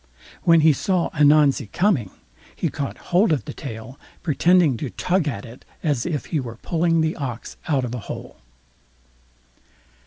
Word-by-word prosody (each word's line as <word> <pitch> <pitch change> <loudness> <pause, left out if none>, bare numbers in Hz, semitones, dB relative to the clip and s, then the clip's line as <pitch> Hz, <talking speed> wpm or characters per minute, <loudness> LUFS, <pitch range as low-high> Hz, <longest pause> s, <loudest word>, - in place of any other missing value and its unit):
When 165 -2 +5
he 155 0 +6
saw 180 +5 0
Ananzi 145 -4 +4
coming, 155 - +1 0.5
he - - -1
caught 140 - -4 0.2
hold 185 +2 +5
of 150 - 0
the 145 - -6
tail, 125 -1 -8 0.2
pretending 170 -2 +3
to 135 - -4
tug 180 +2 0
at 110 -8 -3
it 120 +2 -13 0.2
as 145 -5 0
if 155 -5 -2
he 155 - +2
were 120 -4 -6
pulling 165 -1 +1
the 160 +1 0
ox 130 -6 -5
out 135 -5 +1
of 120 - -5
the 125 - -4
hole. - - -7
150 Hz, 160 wpm, -22 LUFS, 130-165 Hz, 0.5 s, he